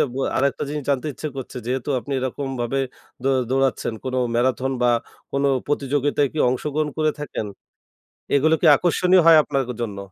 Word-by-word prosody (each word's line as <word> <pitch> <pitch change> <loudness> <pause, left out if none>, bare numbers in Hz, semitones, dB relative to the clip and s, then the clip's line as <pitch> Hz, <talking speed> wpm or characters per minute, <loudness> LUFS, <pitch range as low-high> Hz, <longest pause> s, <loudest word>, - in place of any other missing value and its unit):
বু 130 - -6 0.2
আরেকটা 140 +1 +1
জিনিস 150 -2 -4
জানতে 140 +2 0
ইচ্ছে 155 - -5
করছে 130 -1 -7
যেহেতু 130 +1 -2
আপনি 140 - -7
এরকমভাবে 130 -1 -3 0.4
দৌ 135 - +2 0.2
দৌড়াচ্ছেন 135 -3 +1
কোনো 130 0 -1 0.2
ম্যারাথন 130 +2 +1
বা 125 - +4 0.4
কোনো 140 0 +1 0.2
প্রতিযোগিতায় 145 0 0
কি 155 - -5
অংশগ্রহণ 150 +4 -1
করে 155 0 +3
থাকেন? 130 -7 -4 0.9
এগুলো 155 +3 +4
কি - - +2
আকর্ষণীয় 180 +3 +3
হয় 165 -1 +8
আপনার 135 -3 -2
জন্য? 105 -4 -4
135 Hz, 155 wpm, -22 LUFS, 130-150 Hz, 0.9 s, হয়